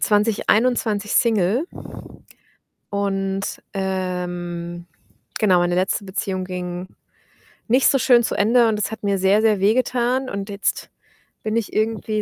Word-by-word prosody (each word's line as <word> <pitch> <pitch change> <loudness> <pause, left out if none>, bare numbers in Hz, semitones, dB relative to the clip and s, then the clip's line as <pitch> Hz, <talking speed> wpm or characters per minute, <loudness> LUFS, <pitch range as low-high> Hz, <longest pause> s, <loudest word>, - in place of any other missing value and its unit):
2021 215 0 +1
Single, 225 - +2 1.2
und, 195 -1 -1 0.3
ähm, 175 -3 -4 0.5
genau, 195 -5 +4
meine 175 0 +1
letzte 190 +2 0
Beziehung 190 0 -3
ging 180 0 -5 0.8
nicht 255 +3 +4
so 275 - +3
schön 245 -2 +4
zu - - -1
Ende 230 +2 +4
und 210 - -1
es - - -1
hat 220 - -8
mir 200 -1 +1
sehr, 195 +3 +3
sehr 215 -2 +3
wehgetan 250 +4 +1
und 200 +1 -5
jetzt 200 -1 -2 0.5
bin 220 +1 -1
ich 230 - -3
irgendwie 215 0 -1
205 Hz, 130 wpm, -21 LUFS, 185-225 Hz, 1.2 s, genau